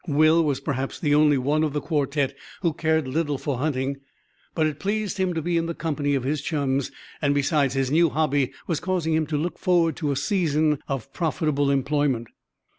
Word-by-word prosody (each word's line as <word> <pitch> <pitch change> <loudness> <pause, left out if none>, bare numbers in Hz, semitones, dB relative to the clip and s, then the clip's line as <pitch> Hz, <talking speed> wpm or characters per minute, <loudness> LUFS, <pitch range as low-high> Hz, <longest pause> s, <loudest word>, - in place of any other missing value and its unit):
Will 155 +2 +4
was 145 -4 0
perhaps 135 -2 -3
the 145 -3 +1
only 150 -1 +5
one 145 +4 +1
of 150 -3 -1
the 150 - 0
quartet 145 -3 -1 0.3
who 170 -4 +1
cared 160 -2 0
little 145 +1 -1
for 135 -2 -3
hunting; 135 -1 -1 0.6
but 160 - +2
it 155 -1 -2
pleased 205 0 -2
him 185 -2 0
to 160 - -2
be 170 +1 0
in 165 0 0
the 170 - -4
company 145 -3 -1
of 135 - -1
his 145 +2 -1
chums, 140 -3 -1 0.3
and, 145 -2 +2
besides, 140 -1 +1
his 135 -1 0
new 165 +2 +4
hobby 145 -3 +1
was 165 -4 -1
causing 180 -4 -1
him 155 -1 +1
to 150 - -1
look 170 +4 -3
forward 170 -4 +2
to 150 -4 -1
a - - 0
season 155 -3 +1
of 135 -1 -4
profitable 150 -4 0
employment. 140 -3 0
150 Hz, 200 wpm, -24 LUFS, 140-160 Hz, 0.6 s, only